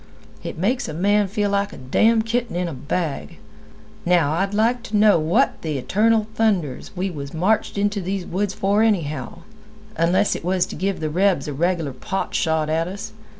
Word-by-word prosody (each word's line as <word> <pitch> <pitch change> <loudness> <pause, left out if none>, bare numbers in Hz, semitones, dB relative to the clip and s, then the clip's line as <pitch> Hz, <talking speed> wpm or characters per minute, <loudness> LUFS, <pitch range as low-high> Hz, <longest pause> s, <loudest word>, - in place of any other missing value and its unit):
It - - -6
makes 230 +9 0
a 155 - -5
man 205 +4 +2
feel 205 +1 -1
like 200 0 0
a - - -10
damn' 220 - +2
kitten 235 -2 -2
in 180 0 -1
a 165 - -5
bag. 140 - -3 0.7
Now, 170 -5 +3
I'd 195 +4 0
like 230 +4 +1
to 215 -3 -1
know 210 -4 +5
what 175 - +1
the 155 -3 -2
eternal 215 - +2
thunders 190 - 0
we 190 +1 -1
was 140 -2 -7
marched 200 +6 +1
into 205 0 0
these 190 0 -3
woods 195 +2 -2
for 200 +2 +2
anyhow, 165 - -1 0.5
unless 175 +5 +2
it - - -6
was 180 +1 +1
to - - -8
give 195 -1 -2
the 155 -1 -2
rebs 185 -3 +2
a 145 - -3
regular 165 -1 0
pot 195 +8 -4
shot 160 -2 +1
at 160 +2 0
us. 195 +2 -7
185 Hz, 190 wpm, -22 LUFS, 160-205 Hz, 0.7 s, know